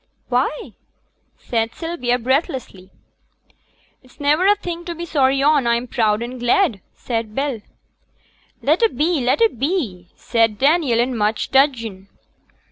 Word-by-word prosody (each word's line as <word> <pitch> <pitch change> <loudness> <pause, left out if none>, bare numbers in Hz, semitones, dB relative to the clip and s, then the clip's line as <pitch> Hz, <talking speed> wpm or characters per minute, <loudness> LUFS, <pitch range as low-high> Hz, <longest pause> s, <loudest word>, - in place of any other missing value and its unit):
'Why?' 255 +4 -1 0.7
said 225 -1 -2
Sylvia, 325 -8 -1
breathlessly. 255 - -2 1.1
'It's 255 -1 -23
niver 300 +6 +2
a 410 - +6
thing 345 -4 -6
to 345 - -5
be 340 +1 -6
sorry 275 -4 +2
on. 290 -4 +3
I'm 235 +1 +1
proud 225 -3 0
and 250 +1 -7
glad,' 245 - +2
said 225 -3 -4
Bell. 270 -5 -2 1.0
'Let 310 +8 +2
a 455 - +5
be, 320 -3 0
let 255 - +1
a 455 - +6
be,' 245 - -3
said 225 -3 +1
Daniel, 280 -3 +2
in 245 +1 0
much 215 0 -1
dudgeon. 230 -8 +1
260 Hz, 135 wpm, -20 LUFS, 230-310 Hz, 1.1 s, a